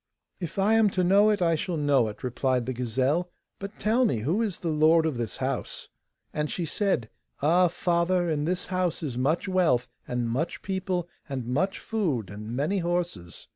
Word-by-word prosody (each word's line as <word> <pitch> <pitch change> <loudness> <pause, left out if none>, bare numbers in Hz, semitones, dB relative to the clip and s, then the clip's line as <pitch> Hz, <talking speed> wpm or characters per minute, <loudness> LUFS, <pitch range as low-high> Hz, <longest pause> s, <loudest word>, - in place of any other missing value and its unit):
'If 170 -1 -6
I 200 +3 +3
am 225 -2 +5
to 185 - +3
know 200 +4 +5
it, 205 -4 +2
I 165 -1 +3
shall 165 +2 -2
know 140 -5 +3
it,' 105 - -8
replied 125 0 0
the 130 - -2
gazelle; 130 +8 0 0.3
'but 200 +1 -7
tell 230 +4 +2
me, 125 - +1
who 165 - +1
is 210 -7 -1
the 170 - -3
lord 160 +1 +4
of 155 -4 0
this 115 -3 -3
house?' - - -3 0.4
And 150 0 -1
she 175 - -2
said: 165 - 0 0.3
'Ah, 175 +5 +4
father! 175 +1 +1
in 150 -2 0
this 180 +2 -1
house 180 -3 0
is 135 -6 -3
much 145 +10 0
wealth, 165 -10 +2 0.2
and 125 -1 -1
much 135 +9 -2
people, 185 -2 -2 0.2
and 130 -3 -3
much 150 +11 0
food, 150 - -2
and 105 +1 -8
many 150 - 0
horses. 170 - -3
165 Hz, 190 wpm, -27 LUFS, 130-185 Hz, 0.4 s, am